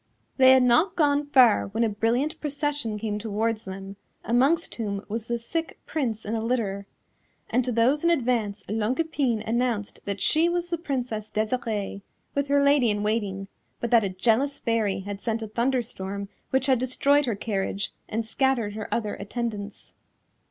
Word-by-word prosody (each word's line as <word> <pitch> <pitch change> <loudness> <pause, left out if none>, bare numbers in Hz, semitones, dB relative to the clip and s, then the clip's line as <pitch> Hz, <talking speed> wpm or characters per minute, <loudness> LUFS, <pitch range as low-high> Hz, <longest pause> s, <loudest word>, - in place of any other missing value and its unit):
"] 115 - -43
They 260 -1 +7
had 260 -1 +5
not 250 +10 +4
gone 290 -2 +2
far 255 -6 +5
when 220 +4 -1
a 230 - +2
brilliant 240 +9 0
procession 290 -6 -2
came 210 -1 -3
towards 220 +1 -1
them, 195 +1 -7 0.3
amongst 275 +8 +2
whom 200 -3 -4
was 220 +2 -4
the 235 - 0
sick 325 +8 -4
Prince 235 -8 -2
in 215 - -3
a 225 - -1
litter, 210 -4 -1 0.6
and 250 +2 +3
to 250 - -2
those 245 +6 +2
in 340 - +4
advance 235 - 0
Longue 220 +5 -1
Epine 275 -9 0
announced 235 -3 -1
that 200 -1 -3
she 320 - +3
was 350 0 -1
the 340 - -1
Princess 245 -8 -3
Desirée, 215 -3 -2 0.3
with 280 0 0
her 280 0 +3
Lady 280 -4 +4
in 205 0 0
Waiting, 205 -3 -1 0.3
but 235 - -3
that 230 -2 +6
a 195 - 0
jealous 230 +9 +1
Fairy 215 -5 0
had 200 +1 -6
sent 225 +1 -2
a - - -4
thunderstorm 215 -4 -2 0.2
which 265 0 +1
had 260 -3 +3
destroyed 280 +3 +2
her 230 - 0
carriage 200 -1 -2 0.2
and 225 +1 -2
scattered 235 -3 0
her 215 0 -6
other 215 -3 -1
attendants. 210 -1 -5
230 Hz, 175 wpm, -26 LUFS, 210-265 Hz, 0.6 s, They